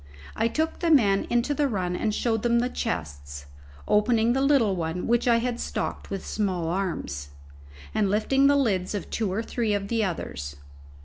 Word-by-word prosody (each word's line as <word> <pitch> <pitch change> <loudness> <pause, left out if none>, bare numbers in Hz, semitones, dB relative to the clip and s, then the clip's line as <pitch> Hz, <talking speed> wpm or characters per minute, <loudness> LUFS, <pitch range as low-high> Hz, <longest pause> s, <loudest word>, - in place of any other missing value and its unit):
I 225 - +2
took 315 +7 -1
the 340 - 0
men 205 -10 +4
into 240 +4 +1
the 290 0 +1
run 185 -7 -2
and 215 +3 0
showed 225 0 0
them 235 0 +2
the 245 +1 +1
chests, 70 - -4 0.4
opening 225 +2 +3
the 265 - +1
little 270 -8 +3
one 165 +1 -3
which 240 +1 +1
I 235 -1 +5
had 240 0 -2
stocked - - -4
with 195 -1 -5
small 185 -6 -1
arms, 165 - -3 0.6
and 210 -2 +1
lifting 270 +7 +3
the 285 - +5
lids 205 -8 +1
of 205 - -5
two 215 -5 -1
or 215 +4 -1
three 225 -2 -1
of 200 0 -3
the 230 -2 +1
others. 70 - -4
215 Hz, 185 wpm, -26 LUFS, 180-240 Hz, 0.6 s, I